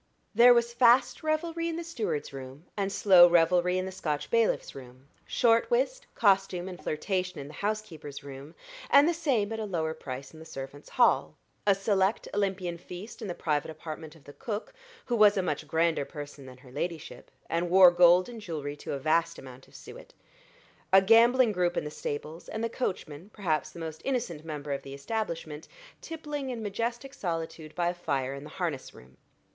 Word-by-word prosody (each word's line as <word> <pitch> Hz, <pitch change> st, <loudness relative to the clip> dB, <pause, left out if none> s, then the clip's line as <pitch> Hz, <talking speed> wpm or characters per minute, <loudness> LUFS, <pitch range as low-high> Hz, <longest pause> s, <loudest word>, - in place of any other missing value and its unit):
There 240 Hz, +3 st, +8 dB
was 235 Hz, 0 st, +1 dB
fast 240 Hz, +1 st, +4 dB
revelry 330 Hz, +2 st, -1 dB
in 330 Hz, -, -3 dB
the 340 Hz, -, -4 dB
steward's 225 Hz, -, -3 dB
room, 135 Hz, +4 st, -9 dB
and 200 Hz, -1 st, -1 dB
slow 185 Hz, -3 st, +7 dB
revelry 175 Hz, +2 st, +3 dB
in 185 Hz, -, -1 dB
the 190 Hz, -, -5 dB
Scotch 150 Hz, -5 st, -3 dB
bailiff's 230 Hz, -1 st, +1 dB
room; 130 Hz, 0 st, -12 dB, 0.2 s
short 230 Hz, -, +3 dB
whist, -, -, 0 dB
costume, 195 Hz, -3 st, +2 dB
and 185 Hz, -1 st, -8 dB
flirtation 180 Hz, +3 st, -2 dB
in 140 Hz, -, -7 dB
the 150 Hz, -, -11 dB
housekeeper's 175 Hz, -8 st, -5 dB
room, 140 Hz, +3 st, -10 dB, 0.3 s
and 285 Hz, +2 st, +7 dB
the 345 Hz, -, +2 dB
same 255 Hz, -11 st, 0 dB
at 220 Hz, -, -4 dB
a 220 Hz, -, -2 dB
lower 160 Hz, -5 st, -2 dB
price 135 Hz, -3 st, -8 dB
in 160 Hz, -, -13 dB
the -, -, -10 dB
servants' 135 Hz, 0 st, -9 dB
hall; 245 Hz, -, +3 dB, 0.3 s
a 200 Hz, -, +6 dB
select 195 Hz, +1 st, +1 dB
Olympian 190 Hz, -4 st, -1 dB
feast 180 Hz, +7 st, -10 dB
in 215 Hz, -, -4 dB
the 175 Hz, -, -4 dB
private 150 Hz, -3 st, -1 dB
apartment 160 Hz, 0 st, -8 dB
of 160 Hz, -, -19 dB
the 145 Hz, -, -13 dB
cook, 220 Hz, -, -5 dB, 0.3 s
who 240 Hz, -, -1 dB
was 210 Hz, -2 st, +6 dB
a 190 Hz, -, +1 dB
much 150 Hz, -5 st, -3 dB
grander 165 Hz, -2 st, +1 dB
person 145 Hz, -1 st, -9 dB
than 125 Hz, -1 st, -12 dB
her 130 Hz, -1 st, -16 dB
ladyship, 160 Hz, +3 st, -5 dB, 0.2 s
and 170 Hz, +1 st, -1 dB
wore 185 Hz, 0 st, +8 dB
gold 175 Hz, +1 st, +5 dB
and 235 Hz, -2 st, -9 dB
jewelry 150 Hz, -6 st, -5 dB
to 145 Hz, -, -6 dB
a -, -, -2 dB
vast 165 Hz, +4 st, +1 dB
amount 130 Hz, 0 st, -12 dB
of -, -, -21 dB
suet; -, -, -12 dB, 0.8 s
a 190 Hz, -, +9 dB
gambling 230 Hz, +4 st, +5 dB
group 180 Hz, -3 st, 0 dB
in -, -, 0 dB
the 150 Hz, -, -6 dB
stables, 155 Hz, +3 st, -6 dB
and 220 Hz, -, -4 dB
the 230 Hz, -, 0 dB
coachman, 180 Hz, -, -4 dB
perhaps 165 Hz, -7 st, -1 dB
the -, -, -14 dB
most 160 Hz, -1 st, -6 dB
innocent 235 Hz, -, -2 dB
member 150 Hz, -2 st, -6 dB
of 140 Hz, -, -2 dB
the 135 Hz, 0 st, -9 dB
establishment, 160 Hz, -3 st, -4 dB, 0.3 s
tippling 295 Hz, -4 st, -5 dB
in 235 Hz, -3 st, -4 dB
majestic 235 Hz, +6 st, -3 dB
solitude 165 Hz, -, -5 dB
by 175 Hz, -1 st, +1 dB
a -, -, -2 dB
fire 135 Hz, -6 st, -2 dB
in 140 Hz, 0 st, -8 dB
the 150 Hz, -, -10 dB
harness 165 Hz, -8 st, -3 dB
room. 65 Hz, +1 st, -17 dB
175 Hz, 195 wpm, -28 LUFS, 150-220 Hz, 0.8 s, a